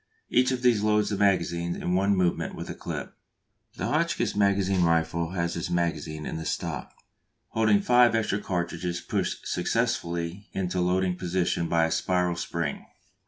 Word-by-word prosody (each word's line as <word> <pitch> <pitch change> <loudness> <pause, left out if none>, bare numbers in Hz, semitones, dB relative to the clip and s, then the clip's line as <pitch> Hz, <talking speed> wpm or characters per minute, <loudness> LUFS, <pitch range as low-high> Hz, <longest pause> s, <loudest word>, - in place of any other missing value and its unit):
Each 125 +1 +4
of 130 -1 -2
these 120 -4 +4
loads 105 0 +2
the - - 0
magazine 85 -3 +1
in 90 - -2
one 100 +2 +3
movement 90 -2 0
with - - -6
a - - -4
clip. - - -6 0.6
The - - -3
Hotchkiss - - 0
magazine 100 -2 +2
rifle 85 +1 +1
has 85 -2 -1
its 85 - -3
magazine 80 -3 -2
in 80 - -4
the 80 - -5
stock, 80 -7 -3 0.6
holding 110 -2 +3
five 120 +1 +5
extra 105 -2 0
cartridges 85 -2 -2
pushed - - -3
successively 85 +3 -1
into 90 -1 -1
loading 90 0 +1
position 85 -1 0
by 85 -1 +3
a 80 - -2
spiral 90 -1 +1
spring. 85 - -3
90 Hz, 160 wpm, -27 LUFS, 85-100 Hz, 0.6 s, five